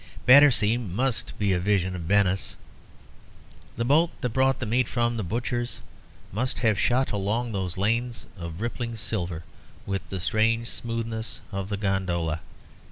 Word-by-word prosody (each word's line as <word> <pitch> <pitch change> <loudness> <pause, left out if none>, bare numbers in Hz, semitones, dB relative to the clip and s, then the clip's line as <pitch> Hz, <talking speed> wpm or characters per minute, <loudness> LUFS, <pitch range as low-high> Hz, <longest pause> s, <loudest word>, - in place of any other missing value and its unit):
Battersea 125 -5 +7
must 120 +3 -1
be 100 -2 +2
a 90 - +1
vision 95 -1 +1
of 90 - -5
Venice. 95 +2 +1 1.2
The 115 - 0
boat 155 +6 +4
that 125 - 0
brought 130 +2 +2
the 120 - -3
meat 120 +2 +1
from 120 -1 0
the 115 - -2
butcher's 120 +5 -2 0.5
must 125 +6 -1
have 110 -5 +2
shot 130 +2 +2
along 105 +4 -1
those 95 -3 -2
lanes 115 +4 0
of 85 -1 -7
rippling 115 0 -3
silver 90 -7 -2 0.4
with 100 -2 -3
the 95 - -3
strange 115 +5 +1
smoothness 115 -1 -4
of 95 0 -4
the 100 - -2
gondola. 90 -5 -1
110 Hz, 150 wpm, -26 LUFS, 95-120 Hz, 1.2 s, Battersea